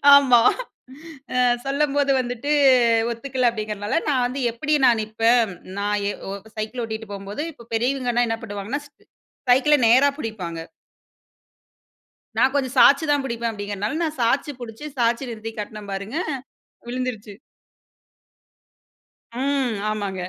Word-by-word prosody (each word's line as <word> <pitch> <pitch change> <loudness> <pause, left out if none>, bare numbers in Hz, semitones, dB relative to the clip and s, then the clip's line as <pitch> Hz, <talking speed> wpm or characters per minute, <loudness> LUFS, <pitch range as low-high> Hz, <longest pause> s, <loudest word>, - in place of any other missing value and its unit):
ஆமா. 260 -4 +7 0.9
அ - - -3 0.3
சொல்லும்போது 280 0 +1
வந்துட்டு 250 +3 -3 0.6
ஒத்துக்கல. 255 +1 0
அப்டிங்குறனால 210 +3 -2
நான் 255 -3 +2
வந்து 265 +3 -5
எப்டி 300 +6 0
நான் 235 -3 +4
நிப்பன். 225 -1 +2 0.2
நான் 205 +1 0
ஏ - - 0 0.2
ஓ - - -4 0.3
சைக்கிள் 225 +3 -3
ஓட்டிட்டு 220 -1 -6
போம்போது 200 +8 -5
இப்ப 235 -4 -16
பெரியவங்க 245 0 +1
என்ன 225 0 -1
பண்ணுவாங்க 205 +6 -4
ஸ் - - -34 0.6
சைக்கிள 275 +4 +5
நேரா 260 +5 +6
புடிப்பாங்க. 180 - -5 1.8
நான் 265 - +3
கொஞ்சம் 265 -1 -1
சாச்சி 285 +4 +7
தான் 285 -2 +2
புடிப்பன். 235 -2 -2
அப்டிங்குறனால 205 - -3
நான் 310 -3 -3
சாச்சி 275 +5 +1
புடிச்சு 230 +5 -8
சாச்சி 240 +2 +1
நிறுத்தி 225 0 -6
காட்டுன 210 0 -6
பாருங்க 200 +8 -4 0.7
விழுந்துருச்சு. 240 -4 -4 2.0
ம். 265 -2 0 0.2
ஆமாங்க. 200 -3 -3
235 Hz, 120 wpm, -23 LUFS, 215-270 Hz, 2.0 s, ஆமா